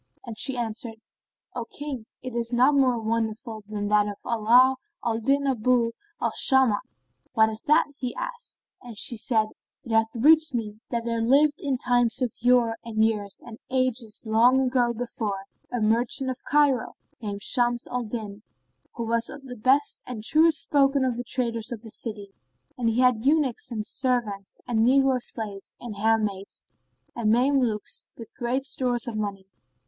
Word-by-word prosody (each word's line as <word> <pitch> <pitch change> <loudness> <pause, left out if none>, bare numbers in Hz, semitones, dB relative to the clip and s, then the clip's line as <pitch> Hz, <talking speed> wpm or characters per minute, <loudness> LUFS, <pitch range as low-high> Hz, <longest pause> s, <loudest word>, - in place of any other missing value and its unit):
And 230 - -7
she 260 +4 0
answered, 225 0 -3 0.6
"O 240 - -3
King, 270 -4 -7 0.2
it 255 -1 -6
is 235 0 -2
not 255 +4 +4
more 260 -3 +3
wonderful 220 0 -3
than 205 -1 -3
that 210 0 +3
of 205 -1 -5
ALA 240 +4 +4 0.3
AL 225 -1 0
DIN 275 +4 +1
ABU 245 -2 +2 0.3
AL - - 0
SHAMAT.[FN#24] 265 -6 +4 0.6
"What 220 -2 +4
is 220 0 -5
that?" 305 +2 +5
asked 290 - -21
he, 250 -2 -4 0.6
and 240 -4 -11
she 235 - +2
said, 220 -1 +1 0.3
It 235 - -8
hath 225 0 +3
reached 310 +3 +5
me 215 -2 -4
that 235 -1 -2
there 230 -1 -1
lived, 285 +5 +3
in 275 -3 -1
times 245 0 +2
of 250 -4 -1
yore 240 -1 +3
and 220 -1 +1
years 205 -3 -3
and 235 -2 -10
ages 255 -4 -1
long 245 +4 +4
gone 240 -2 +1
before, 210 -5 -4 0.3
a 245 - -1
merchant 235 +4 +1
of 255 - -8
Cairo[FN#25] 285 -5 +3 0.3
named 205 -2 -5
Shams 240 -2 +2
al 250 - -3
Din, 215 -3 -6 0.5
who 235 - -3
was 230 +1 0
of 285 -1 -10
the 250 -1 -8
best 265 +6 +2
and 235 -4 -5
truest 315 +5 +3
spoken 275 -2 +2
of 250 -2 0
the 245 - -4
traders 235 -2 -1
of 235 -1 -6
the 225 - -10
city; 205 -4 -4 0.4
and 235 -2 0
he 230 +3 +1
had 250 -2 +4
eunuchs 275 -1 +1
and 215 -3 -4
servants 230 -8 -2
and 235 -2 0
negro 260 +2 +4
slaves 205 -5 -6
and 235 -3 -7
handmaids 210 -2 0 0.5
and 230 -3 0
Mame 260 +5 +3
lukes 220 -5 -2
and 230 - -8
great 250 +3 -2
store 255 -2 0
of 235 -1 -4
money. 200 -2 -4
235 Hz, 175 wpm, -25 LUFS, 220-255 Hz, 0.6 s, that